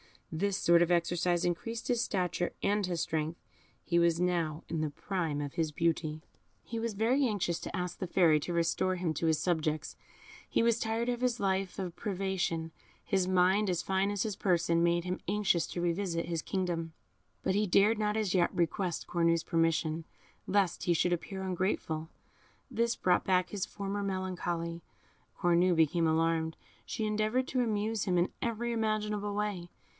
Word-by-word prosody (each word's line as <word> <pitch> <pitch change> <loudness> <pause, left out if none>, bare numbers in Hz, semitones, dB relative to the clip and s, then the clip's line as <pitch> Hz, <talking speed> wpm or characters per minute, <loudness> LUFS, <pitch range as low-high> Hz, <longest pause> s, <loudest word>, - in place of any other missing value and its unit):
This 195 +5 0
sort 170 -2 +5
of 175 - +3
exercise 175 0 +1
increased 230 +8 -2
his 240 -2 +2
stature 180 -5 -1
and 205 0 +2
his 175 -2 -2
strength. 160 +1 -2 0.5
He 170 -1 +2
was 170 -1 +3
now 170 -4 0
in 165 - -2
the 155 - 0
prime 160 -2 -2
of 145 -1 -5
his 160 -2 -1
beauty. 160 -1 -1 0.4
He 230 - -5
was 230 -1 -2
very 245 +7 +2
anxious 190 -6 -1
to - - -6
ask 180 -1 -3
the 185 - -3
Fairy 170 -4 +4
to 175 +4 -4
restore 170 +2 +1
him 175 -3 -1
to 165 - -1
his 160 -1 +3
subjects; 155 -3 -1 0.5
he - - +2
was 235 0 +3
tired 225 +2 -1
of 240 -1 -1
this 250 -1 0
life 190 -1 0
of 185 -3 -4
privation; 190 -5 -2 0.3
his 190 -2 +1
mind, 185 +3 +3
as 175 -1 0
fine 190 +1 +1
as 205 -1 0
his 215 -4 -3
person, 170 -3 +2
made 170 0 +2
him 180 +1 -3
anxious 195 -4 +1
to 175 - -4
revisit 170 -1 -1
his 165 -1 -2
kingdom; 175 -4 -2 0.5
but 190 - +1
he 210 +2 +1
dared 210 +4 +4
not 210 0 +1
as 210 -4 0
yet 175 -2 +2
request 175 +1 -1
Cornue's 170 -1 +2
permission, 165 -1 0 0.4
lest 195 -2 +1
he 175 - +3
should 175 +2 +2
appear 190 +3 -4
ungrateful. 180 -4 -2 0.6
This 235 0 +1
brought 180 -1 +2
back 185 -1 +2
his 200 -3 -2
former 200 0 -4
melancholy. 175 -3 -3 0.6
Cornue 175 +1 +4
became 160 +1 +3
alarmed; 160 0 +1 0.3
she 220 - -3
endeavoured 215 +4 0
to 255 - +1
amuse 220 -2 0
him 180 -2 +1
in 175 +1 +2
every 235 0 -1
imaginable 210 -2 -1
way. 205 -4 -2
180 Hz, 175 wpm, -31 LUFS, 170-205 Hz, 0.6 s, sort